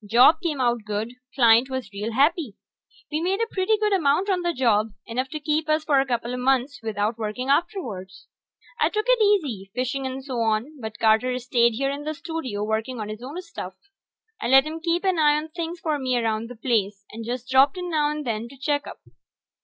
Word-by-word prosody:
Job 235 - +5
came 315 -6 -2
out 240 -3 +1
good; 215 +3 -3 0.2
client 235 0 +5
was 260 -5 -4
real 210 +3 -3
happy. 285 - +2 0.6
We 305 +1 -1
made 375 +4 0
a 460 - +2
pretty 385 +3 +2
good 420 -1 +1
amount 360 +3 +2
on 365 -1 +1
the 345 0 0
job, 225 -7 +1
enough 255 +3 -3
to 305 - -5
keep 305 +1 -1
us 310 0 +2
for 290 -3 +3
a 270 - +1
coupla 240 0 -2
months 265 0 +1
without 220 0 -2
working 225 +4 -3
afterwards. 235 - -2 0.5
I - - +3
took 425 0 -1
it - - +4
easy, 290 - +1
fishing 260 +2 -1
and 260 0 -6
so 255 -4 -3
on, 230 +6 -1
but 220 -1 -6
Carter 225 +3 +3
stayed 240 -1 +2
here 275 +3 0
in 285 +1 -5
the 310 +1 -3
studio 320 -10 -4
working 220 +3 -2
on 210 -1 -4
his 215 +1 -7
own 280 +8 -6
stuff. - - -8 0.7
I - - -1
let 265 +2 +7
him 315 +1 -5
keep 335 +2 0
an 375 -3 +1
eye 295 -1 +5
on 310 +1 -4
things 335 +1 -5
for 305 -3 -1
me 255 -2 0
around 225 -1 -1
the 245 - -8
place, 210 -4 -1
and 225 +1 -7
just 245 +2 -4
dropped 265 +4 +4
in 360 -1 -4
now 300 -2 +2
and 300 -1 -4
then 230 0 -3
to 275 - -14
check 290 +2 -1
up. - - -10
260 Hz, 215 wpm, -24 LUFS, 225-310 Hz, 0.7 s, let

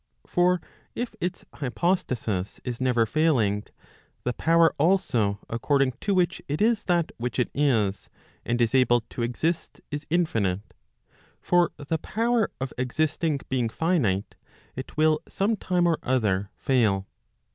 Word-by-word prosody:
For 180 0 +2 0.4
if 240 -1 -3
its 180 +1 -3
hypostasis 125 - -1
is 125 -1 -4
never 125 -3 +3
failing, 115 -7 +1 0.6
the 125 - -1
power 165 +2 +4
also 140 - +2
according 130 +3 +1
to 200 -2 +1
which 180 -2 +1
it 145 +2 -2
is 225 +1 +2
that 175 -3 +1
which 120 -1 -3
it 125 - 0
is, 115 -9 +1 0.3
and 120 +1 -1
is 120 0 +2
able 125 -2 +4
to 115 - -8
exist, 160 +8 -2
is 145 +1 -5
infinite. 110 - 0 0.7
For 175 -1 +3
the 155 +3 -2
power 230 +4 +1
of 135 0 -4
existing 150 +3 0
being 125 -3 0
finite, 115 - 0 0.4
it 130 +4 -8
will 155 0 +4
some 205 +3 0
time 180 -3 0
or 165 -2 +2
other 100 -7 0
fail. 110 -7 +1
140 Hz, 135 wpm, -26 LUFS, 115-170 Hz, 0.7 s, power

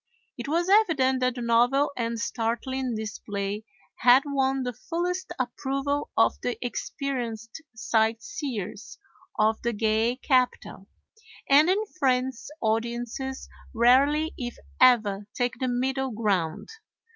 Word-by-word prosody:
It 240 +2 -7
was 335 +4 0
evident 320 -11 +3
that 255 -1 0
the 245 - -5
novel 245 +5 +3
and 230 -1 -2
startling 240 +2 -2
display 210 -1 -4 0.3
had 250 +3 +6
won 270 -2 0
the 250 0 -3
fullest 355 +7 -3
approval 275 +3 -2
of - - +3
the 245 - -2
experienced 240 -2 -4
sight 225 -1 +1
seers 230 - -6 0.4
of 215 +1 +2
the 235 0 -1
gay 220 +2 +1
capital; 255 -7 0 0.6
and 295 +4 +6
in 410 +4 +2
France 255 -2 0
audiences 235 +4 -2 0.3
rarely 280 +7 +4
if 240 -2 -4 0.2
ever 210 -6 +4
take 245 -1 -1
the 260 - -1
middle 265 +2 -1
ground. 200 -8 -1
245 Hz, 120 wpm, -26 LUFS, 225-270 Hz, 0.6 s, had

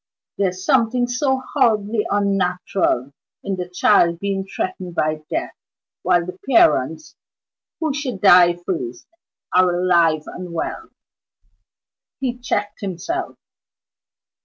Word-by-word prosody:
There's 185 -1 -1
something 245 -2 +2
so 260 +2 0
horribly 215 -5 +1
unnatural 180 -8 0 0.3
in 195 - -2
the 180 -1 -5
child 180 -2 +3
being 195 +1 -3
threatened 185 -2 -5
by 155 -1 0
death, - - -3 0.5
while 175 -1 +2
the 180 +1 -8
parents 310 - +3 0.6
(who 315 -3 -1
should 270 -8 -4
die 180 -3 +6
first) 125 -10 -4 0.5
are 185 0 +5
alive 170 -4 +3
and 180 -1 -8
well 165 - -4 0.6
" - - -56
He 250 -2 -3
checked 205 -4 -3
himself. 200 - -4
190 Hz, 110 wpm, -20 LUFS, 175-240 Hz, 0.6 s, die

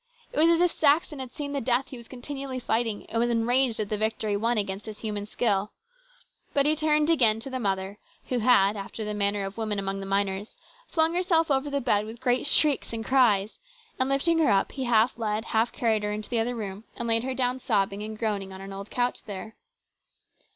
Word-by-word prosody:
It - - -1
was 325 +2 +6
as 335 0 +3
if 355 -1 +4
Saxon 300 0 +2
had 260 -2 -6
seen 285 +1 -5
the 280 - -1
death 250 +2 +1
he 260 - -8
was 235 -1 -12
continually 270 +1 -6
fighting, 225 -3 -1
and 230 - -3
was 240 +1 +2
enraged 240 +1 +2
at 210 -2 -2
the 210 - -2
victory 215 -1 -1
won 230 +3 0
against 200 0 -2
his 215 -1 -8
human 210 -2 -4
skill. 210 -3 0 0.8
But 280 -1 +3
he 305 +1 +5
turned 305 0 +2
again 230 -9 +4
to 270 - -8
the 260 - -3
mother, 195 -2 -2 0.3
who 250 - 0
had, 215 -4 +4
after 205 +2 -6
the 210 - -3
manner 200 -1 0
of 195 +3 -7
women 215 -2 -1
among 195 0 -3
the 195 - -6
miners, 195 +1 -1 0.3
flung 320 0 +2
herself 340 -3 +2
over 270 +1 +1
the 280 0 -1
bed 210 -4 +2
with 225 +1 -9
great 255 +2 +1
shrieks 290 -5 +2
and 225 -1 -4
cries, 220 -6 +3 0.4
and 260 +1 +1
lifting 325 +5 +2
her 315 - +3
up 195 -2 +2
he 265 -2 -4
half 235 0 +3
led, 215 0 -2
half 225 +1 +1
carried 220 -3 +1
her 210 0 -2
into 210 +2 -5
the 235 - +1
other 240 +2 -1
room 205 -2 -6
and 235 - -4
laid 225 0 +3
her 260 0 -3
down 255 0 +1
sobbing 200 -4 0
and 215 +1 -6
groaning 205 -4 -2
on 190 - -9
an 195 0 -8
old 195 +1 -8
couch 245 0 -1
there. 215 +2 -7
230 Hz, 225 wpm, -26 LUFS, 210-265 Hz, 0.8 s, was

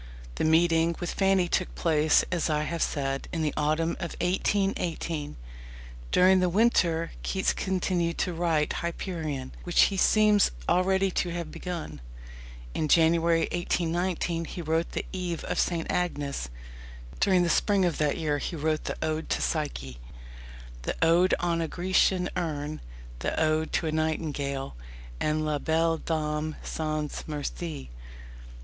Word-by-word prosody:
The - - 0
meeting 165 +1 +3
with 175 - -3
Fanny 195 -2 +3
took 180 +1 -1
place, 155 -2 +3
as 170 -2 0
I 150 0 +1
have 165 +1 -3
said, 135 -1 -1
in 165 -2 -1
the 150 - 0
autumn 155 +2 +1
of 170 - -5
1818. 180 -5 -1 0.7
During 185 +1 +5
the 180 -1 +2
winter 175 -5 +2
Keats 190 -1 0
continued 180 -3 -1
to 180 - -1
write 165 -3 +1
Hyperion, 160 -6 -4
which 175 - 0
he - - -2
seems 210 +1 +5 0.2
already 190 +1 +2
to 180 - 0
have 170 -2 -4
begun. 165 - -6 0.7
In 155 - -1
January 165 +1 +4
1819 175 0 -1
he 175 - -6
wrote 160 +1 0
The - - -3
Eve 180 -3 -3
of - - -2
St. 170 -2 0
Agnes. 145 - -2 0.7
During 185 -3 +4
the - - +1
spring 200 +1 +3
of 175 - -1
that 150 -2 +1
year, 150 -3 0
he 170 - -4
wrote 155 0 -1
the - - -3
Ode 155 0 -2
to - - 0
Psyche, 65 - -3 0.8
the - - -3
Ode 175 +3 +4
on 170 -1 0
a 165 - -1
Grecian 180 +1 +2
Urn, 155 -4 -3 0.4
the - - -2
Ode 155 0 +1
to - - +1
a 155 - 0
Nightingale, 150 - -2 0.4
and 155 0 0
La 150 -1 0
Belle 165 +2 +1
Dame 155 -1 -2
sans 155 -1 -3
Merci. 150 - -5
165 Hz, 145 wpm, -27 LUFS, 155-180 Hz, 0.8 s, During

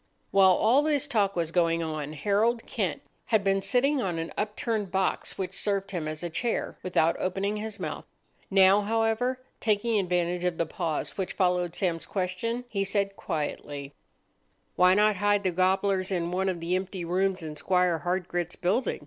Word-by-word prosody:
While 190 -1 +6
all 230 +9 +4
this 295 -1 +1
talk 210 -8 +1
was 165 -2 -1
going 165 -1 +2
on, 155 -2 -4
Harold 210 +9 +1
Kent - - -2 0.2
had 220 -4 +2
been 195 0 +2
sitting 255 +8 +2
on 180 -6 -2
an 165 0 -4
upturned 210 -1 -2
box 190 0 -1
which 190 -1 -3
served 200 0 -1
him 170 -5 -3
as 155 +2 -5
a 175 - -2
chair, 230 +7 -2
without 170 -2 +2
opening 195 +3 -1
his 215 0 -6
mouth. - - -5 0.4
Now, 195 +1 +6
however, 225 +4 0 0.2
taking 215 0 +1
advantage 180 -1 0
of 180 -2 0
the 170 - +1
pause 160 +2 -3
which 190 - -2
followed 180 -2 +1
Sam's 175 -4 -1
question, 205 +6 -2
he 200 -4 -1
said 200 0 0
quietly,— 145 -3 -4 0.8
"Why 180 +1 +5
not 210 0 +3
hide 205 +1 +2
the 185 - +1
gobblers 190 +1 +1
in 175 -2 -1
one 190 +1 0
of 175 -3 -3
the 170 +2 0
empty 185 -1 -3
rooms 185 +1 0
in 155 -1 -6
Squire 180 +1 +1
Hardgrit's 175 -1 -2
building? 210 +8 0
190 Hz, 175 wpm, -27 LUFS, 175-205 Hz, 0.8 s, While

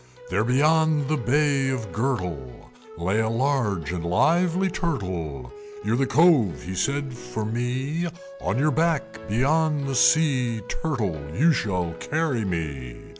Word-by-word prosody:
There, - - +2
beyond 150 +3 +2
the 155 - +2
Bay 140 +1 +1
of 115 -6 -3
Gurtle, 90 - -3 0.3
Lay 95 +5 0
a 110 0 +1
large 115 - 0
and 90 -2 -4
lively 165 - +2
Turtle. 95 - -3 0.3
"You're - - +1
the 135 +2 +1
Cove," 135 - +4
he 95 - -5
said, 140 +8 -1
"for 120 -2 -5
me; 130 +9 -2 0.3
On - - -1
your 150 +3 +2
back 160 0 +2 0.3
beyond 145 +5 +1
the 135 - -2
sea, 130 -6 +3
Turtle, 115 - -2
you 160 +5 +4
shall 90 - -1
carry 125 - -1
me!" 75 -10 -4
125 Hz, 135 wpm, -24 LUFS, 95-150 Hz, 0.3 s, Cove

